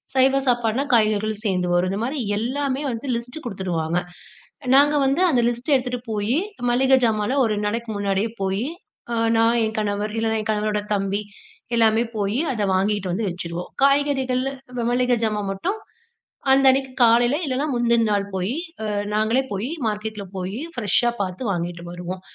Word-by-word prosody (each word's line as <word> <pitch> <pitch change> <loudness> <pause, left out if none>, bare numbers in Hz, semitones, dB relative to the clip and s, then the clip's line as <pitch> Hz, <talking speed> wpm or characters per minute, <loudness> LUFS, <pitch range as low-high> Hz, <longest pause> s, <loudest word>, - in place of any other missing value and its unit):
சைவ 265 +1 +4
சாப்பாடுன்னா 240 +1 +2
காய்கறிகள் 215 -1 +2
சேர்ந்து 180 -3 +1
வரும். 175 +1 +2
இந்த 195 - -2
மாதிரி 270 +5 -2 0.2
எல்லாமே 265 +4 -1
வந்து 235 +4 -5
லிஸ்ட் 240 +4 -5
குடுத்துருவாங்க. 175 -6 -2 0.8
நாங்க 290 +2 +6
வந்து 275 +5 +1
அந்த 255 -6 +3
லிஸ்ட்ட 240 +5 0
எடுத்துட்டு 250 -1 -3
போயி 215 +6 0 0.3
மளிகை 265 +2 +4
ஜாமான்ல 220 +3 +1
ஒரு 225 - 0
2 210 0 -2
நாளைக்கு 230 +2 -3
முன்னாடியே 200 +2 0
போயி 195 +3 0 0.5
அ - - -1 0.2
நா 225 - +4 0.2
என் 220 0 -3
கணவர், 210 0 -1
இல்லனா 225 0 0
என் 215 - -2
கணவரோட 210 0 0
தம்பி 200 +1 -1 0.5
எல்லாமே 225 0 +4
போயி, 205 +3 0
அத 220 -4 -2
வாங்கிட்டு 195 0 0
வந்து 210 +4 -1
வெச்சுருவோம். 175 0 -5
காய்கறிகள், 275 -2 +2 0.5
மளிகை 250 0 +2
ஜாமான் 210 -2 -1
மட்டும் 365 - -2 0.7
அந்த 270 0 +5
அன்னைக்கு 265 0 -1
காலையில, 240 +3 +5
இல்லனா 270 +1 -1
முந்தின 235 -1 +2
நாள் 200 -1 +1
போயி 190 +7 -1 0.6
நாங்களே 220 +5 +2
போயி 205 +5 -2 0.2
மார்க்கெட்ல 210 -1 -4
போயி 190 +5 -4 0.2
பிரெஷ்ஷா 240 +2 +2
பார்த்து 185 +4 -3
வாங்கிட்டு 175 -1 -4
வருவோம். 180 +1 -6
220 Hz, 155 wpm, -22 LUFS, 200-250 Hz, 0.8 s, நாங்க